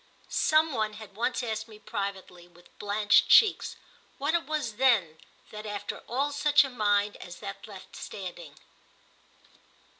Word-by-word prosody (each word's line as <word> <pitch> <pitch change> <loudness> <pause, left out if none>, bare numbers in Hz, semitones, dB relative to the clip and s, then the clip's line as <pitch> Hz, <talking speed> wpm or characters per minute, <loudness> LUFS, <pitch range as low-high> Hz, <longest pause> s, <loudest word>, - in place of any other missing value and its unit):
Some 310 0 +3
one 215 -3 -1
had 210 -2 -11
once 245 +3 -1
asked 220 -1 -3
me 215 -2 -13
privately, 190 -4 -6
with 175 0 -22
blanched 205 0 +3
cheeks, 440 - +5 0.4
what 285 +3 -1
it 340 -1 0
was 295 -9 -3
then 210 -12 +3 0.3
that 215 0 -8
after 205 -1 -5
all 275 +5 0
such 290 0 +4
a 270 - -5
mind 205 -3 +1
as 175 - -10
that 195 +3 -8
left 195 -3 -12
standing. 175 -6 -8
215 Hz, 145 wpm, -28 LUFS, 200-260 Hz, 0.4 s, cheeks